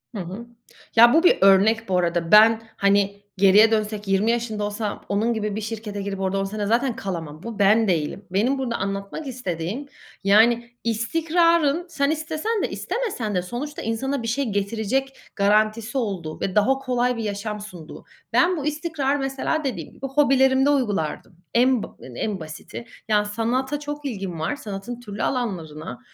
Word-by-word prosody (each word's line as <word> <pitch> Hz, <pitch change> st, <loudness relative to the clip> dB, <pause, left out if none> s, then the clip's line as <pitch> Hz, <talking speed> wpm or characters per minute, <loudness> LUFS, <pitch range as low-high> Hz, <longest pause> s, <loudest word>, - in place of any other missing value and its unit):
Hı 195 Hz, -, -3 dB
hı. 190 Hz, +7 st, -7 dB, 0.5 s
Ya, 235 Hz, +2 st, +8 dB
bu 330 Hz, +2 st, +4 dB
bir 355 Hz, -, +5 dB
örnek 200 Hz, +3 st, +4 dB
bu 180 Hz, -, +2 dB
arada. 170 Hz, -1 st, 0 dB
Ben, 220 Hz, +1 st, +7 dB
hani, 200 Hz, 0 st, +2 dB, 0.2 s
geriye 205 Hz, +3 st, +6 dB
dönsek 210 Hz, -1 st, -1 dB
20 195 Hz, +4 st, +2 dB
yaşında 225 Hz, -3 st, -2 dB
olsam 205 Hz, 0 st, -4 dB
onun 220 Hz, +4 st, +1 dB
gibi 210 Hz, -2 st, -2 dB
bir 215 Hz, -, -3 dB
şirkete 210 Hz, -2 st, -5 dB
girip 195 Hz, -1 st, -4 dB
orada 195 Hz, 0 st, 0 dB
10 -, -, 0 dB
sene 205 Hz, +1 st, -3 dB
zaten 240 Hz, +2 st, +1 dB
kalamam. 165 Hz, -, -6 dB
Bu 225 Hz, -2 st, -7 dB
ben 210 Hz, +2 st, +4 dB
değilim. 175 Hz, +3 st, -1 dB
Benim 240 Hz, +8 st, +1 dB
burada 250 Hz, -3 st, -2 dB
anlatmak 200 Hz, +9 st, -4 dB
istediğim 225 Hz, -, -4 dB, 0.4 s
yani 235 Hz, +4 st, +4 dB
istikrarın 325 Hz, +7 st, +2 dB
sen 280 Hz, -3 st, 0 dB
istesen 315 Hz, +8 st, -2 dB
de -, -, -1 dB
istemesen 255 Hz, -, -3 dB
de 180 Hz, -, +2 dB
sonuçta 250 Hz, +11 st, -6 dB
insana 240 Hz, +3 st, -2 dB
bir -, -, -3 dB
şey 270 Hz, +4 st, 0 dB
getirecek 220 Hz, +7 st, -1 dB, 0.2 s
garantisi 215 Hz, +4 st, +2 dB
olduğu 185 Hz, -10 st, -3 dB
ve 190 Hz, -, -2 dB
daha 265 Hz, +6 st, +3 dB
kolay 250 Hz, -2 st, 0 dB
bir 225 Hz, -, -3 dB
yaşam 210 Hz, +1 st, -4 dB
sunduğu. 180 Hz, -6 st, -10 dB, 0.3 s
Ben 350 Hz, 0 st, +3 dB
bu 290 Hz, -, -4 dB
istikrarı, 300 Hz, -2 st, -1 dB
mesela, 270 Hz, +3 st, -1 dB
dediğim 195 Hz, -, -4 dB
gibi 270 Hz, -, -8 dB
hobilerimde 270 Hz, -1 st, +3 dB
uygulardım. 205 Hz, -, -1 dB, 0.2 s
En 250 Hz, -1 st, +3 dB
b -, -, -5 dB, 0.3 s
en 205 Hz, -4 st, -2 dB
basiti. 160 Hz, +8 st, -9 dB, 0.2 s
Yani 210 Hz, -1 st, +2 dB
sanata 250 Hz, +7 st, -1 dB
çok 295 Hz, 0 st, -6 dB
ilgim 195 Hz, -, -4 dB
var. 160 Hz, -, -1 dB
Sanatın 220 Hz, -1 st, -7 dB
türlü 210 Hz, -3 st, -6 dB
alanlarına 165 Hz, -, -3 dB
220 Hz, 165 wpm, -23 LUFS, 200-265 Hz, 0.5 s, Ya